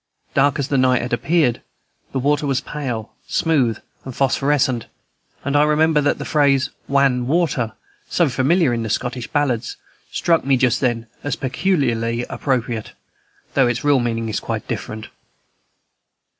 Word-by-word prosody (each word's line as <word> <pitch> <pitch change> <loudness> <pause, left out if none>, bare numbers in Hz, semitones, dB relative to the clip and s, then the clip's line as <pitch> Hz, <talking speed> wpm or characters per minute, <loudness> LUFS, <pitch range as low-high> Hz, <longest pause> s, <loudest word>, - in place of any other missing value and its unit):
Dark 140 +1 +3
as 140 0 -2
the 140 -3 +2
night 130 -1 +3
had 125 - -4
appeared, 155 -7 +2 0.5
the - - -2
water 145 +2 +1
was 135 -2 +1
pale, 130 -7 -5
smooth, 135 -9 +1 0.3
and 130 -2 -8
phosphorescent, 135 -2 +1 0.6
and 140 +1 -1
I 145 - +6
remember 150 0 +3
that 145 - +1
the - - -6
phrase 140 -3 +2 0.2
"wan 135 -3 +2
water," 140 -8 +1 0.4
so 170 - +2
familiar 140 +3 +2
in 115 - -1
the 110 - -3
Scottish 125 +2 -2
ballards, 140 -6 -1 0.3
struck 165 -1 +2
me 135 -1 +3
just 125 -1 +2
then 120 -3 0 0.2
as 145 -3 -1
peculiarly 125 -6 0
appropriate, 120 -5 -2 0.6
though 135 -3 +4
its 120 0 -1
real 145 -2 +4
meaning 115 -1 -1
is 110 - -2
quite - - -4
different. 110 0 -5
135 Hz, 150 wpm, -20 LUFS, 120-145 Hz, 0.6 s, I